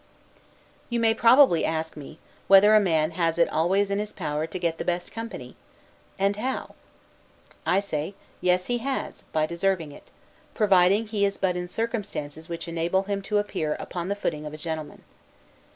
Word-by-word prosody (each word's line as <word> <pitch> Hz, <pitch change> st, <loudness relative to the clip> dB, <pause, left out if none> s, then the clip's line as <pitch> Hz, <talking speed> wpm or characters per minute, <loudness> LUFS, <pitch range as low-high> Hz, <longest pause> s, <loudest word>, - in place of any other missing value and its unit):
You 235 Hz, -1 st, 0 dB
may 225 Hz, -1 st, +4 dB
possibly 235 Hz, -, +5 dB
ask 160 Hz, 0 st, -2 dB
me, 150 Hz, +1 st, -10 dB, 0.3 s
whether 195 Hz, +2 st, +7 dB
a 215 Hz, -, +8 dB
man 160 Hz, -5 st, +1 dB
has 165 Hz, -1 st, 0 dB
it 170 Hz, -, +4 dB
always 195 Hz, +5 st, +1 dB
in 200 Hz, -, 0 dB
his 210 Hz, 0 st, -3 dB
power 150 Hz, +1 st, -3 dB
to 185 Hz, -, -6 dB
get 170 Hz, -2 st, -2 dB
the -, -, -2 dB
best 175 Hz, 0 st, -2 dB
company? 230 Hz, +1 st, -7 dB, 0.6 s
and 200 Hz, +1 st, +1 dB
how? 255 Hz, +5 st, -3 dB, 0.9 s
I 195 Hz, -, +3 dB
say, 165 Hz, -1 st, -4 dB, 0.3 s
Yes, 180 Hz, 0 st, +2 dB
he 245 Hz, 0 st, -1 dB
has, 270 Hz, +3 st, -3 dB
by 155 Hz, -1 st, +1 dB
deserving 170 Hz, -1 st, -1 dB
it; -, -, -14 dB, 0.5 s
providing 200 Hz, 0 st, +4 dB
he 210 Hz, -2 st, -1 dB
is 200 Hz, 0 st, +1 dB
but 185 Hz, -2 st, 0 dB
in 180 Hz, 0 st, -3 dB
circumstances 195 Hz, -8 st, -4 dB
which 170 Hz, 0 st, -5 dB
enable 170 Hz, +3 st, 0 dB
him 200 Hz, 0 st, -3 dB
to 210 Hz, +1 st, -1 dB
appear 160 Hz, -7 st, -1 dB
upon 175 Hz, -1 st, -5 dB
the 200 Hz, -, 0 dB
footing 150 Hz, -7 st, -3 dB
of 150 Hz, -, -8 dB
a -, -, -9 dB
gentleman. 155 Hz, -1 st, -6 dB
185 Hz, 175 wpm, -26 LUFS, 165-205 Hz, 0.9 s, a